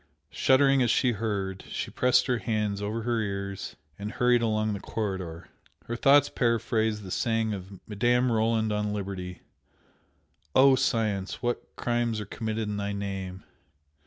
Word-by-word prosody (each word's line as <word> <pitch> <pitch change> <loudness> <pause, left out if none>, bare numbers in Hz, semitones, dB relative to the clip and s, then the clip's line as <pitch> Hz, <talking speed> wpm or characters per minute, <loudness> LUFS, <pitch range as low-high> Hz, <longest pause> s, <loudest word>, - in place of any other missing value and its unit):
Shuddering 135 - +4
as 120 - +2
she 125 +2 +3
heard, 100 -4 -3
she - - -4
pressed 125 0 +3
her 125 -3 0
hands 105 -1 -1
over 110 +2 -3
her 120 0 0
ears 100 -2 -4 0.2
and 105 +2 -5
hurried 125 -1 +3
along 110 -1 +1
the 100 - -4
corridor. 95 -7 -4 0.4
Her 120 - -3
thoughts 140 +3 +5
paraphrased 110 -3 0
the 95 - -8
saying 115 0 0
of 95 -1 -8
Madame 120 +4 +2
Roland 110 -1 +1
on 105 0 -1
Liberty 95 -3 -5 1.1
"Oh, 135 +1 +7
Science! 110 -6 -1
what 120 0 -3
crimes 120 -2 0
are 105 - -5
committed 110 +1 -3
in 105 -1 -3
thy 100 0 -2
name!" 95 -2 -5
110 Hz, 150 wpm, -27 LUFS, 100-120 Hz, 1.1 s, Oh